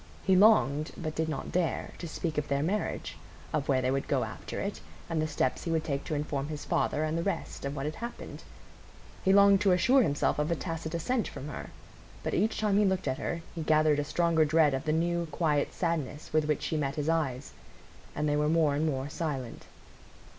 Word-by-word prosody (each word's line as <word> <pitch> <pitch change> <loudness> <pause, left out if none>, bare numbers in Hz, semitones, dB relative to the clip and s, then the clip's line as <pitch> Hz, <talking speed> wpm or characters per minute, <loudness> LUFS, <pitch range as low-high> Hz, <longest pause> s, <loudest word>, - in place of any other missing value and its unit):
He 190 - +4
longed, 155 - +4
but 155 -3 -4
did 160 0 -1
not 155 - -4
dare, 175 -2 -1
to 170 - -5
speak 160 -1 -2
of 150 - -4
their 140 +1 0
marriage, 200 +6 -2 0.3
of 150 -2 -1
where 130 -2 +3
they 130 - +1
would 135 0 -1
go - - +1
after - - -6
it, - - -3 0.3
and 165 -2 -1
the 155 - 0
steps 145 -4 -1
he - - -2
would 160 -1 +1
take 140 -3 -2
to 155 - -2
inform 145 -1 -2
his 150 -1 -6
father, 150 - 0
and 155 +1 -1
the 165 - 0
rest, 195 -5 -3
of 140 +1 -3
what 135 -1 -3
had 155 - -2
happened. 235 +1 -7 0.8
He 190 - +4
longed 200 0 +6
to 195 -3 +4
assure 255 +9 +5
himself 145 - +1
of 150 +2 0
a 170 - +1
tacit 165 0 -4
assent 225 +7 0
from 145 - -7
her. - - -7 0.5
But - - -2
each 215 +4 +1
time 210 -2 +2
he - - +4
looked 190 -1 0
at 130 - -1
her, 170 -1 -3
he 165 - -5
gathered 155 -1 +3
a - - +1
stronger 165 +1 +2
dread 155 -1 +4
of 135 - -2
the 155 - +1
new, 170 +1 0
quiet 150 -2 0
sadness 155 -4 -3
with 155 -1 +3
which 150 -1 0
she 160 - -1
met 140 -2 -1
his 150 0 -2
eyes. 145 -5 -1 0.6
And 150 - 0
they 145 - +2
were 150 0 +2
more 160 -3 +3
and 150 +3 0
more 135 -2 -2
silent. 145 -6 -4
155 Hz, 225 wpm, -29 LUFS, 145-170 Hz, 0.8 s, longed